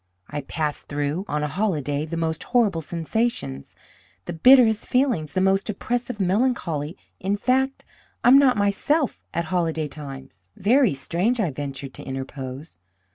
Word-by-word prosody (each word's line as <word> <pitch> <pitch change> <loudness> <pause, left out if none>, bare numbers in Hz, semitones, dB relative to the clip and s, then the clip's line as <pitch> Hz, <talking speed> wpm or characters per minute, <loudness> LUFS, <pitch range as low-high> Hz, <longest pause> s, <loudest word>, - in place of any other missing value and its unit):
I 145 - -3
pass 150 +1 -3
through, 145 +5 -3
on 150 0 -1
a - - 0
holiday, 150 -5 -1
the 165 +1 -4
most 160 -1 -1
horrible 210 -9 +2
sensations, 165 - -3 0.5
the 175 - -4
bitterest 225 +4 +6
feelings, 245 - +1
the 185 - +1
most 195 +2 +2
oppressive 240 +2 -3
melancholy; 185 - 0 0.2
in 195 +2 -1
fact, 265 +4 0 0.4
I - - +6
am 270 +2 +9
not 260 -5 +4
myself 240 +9 +1
at 170 +1 -2
holiday 160 -3 0
times." 135 -8 -10
"Very 235 - +3
strange," 180 - 0
I 185 -8 +1
ventured 140 -1 -6
to - - -10
interpose. 135 - -7
175 Hz, 145 wpm, -24 LUFS, 145-230 Hz, 0.5 s, am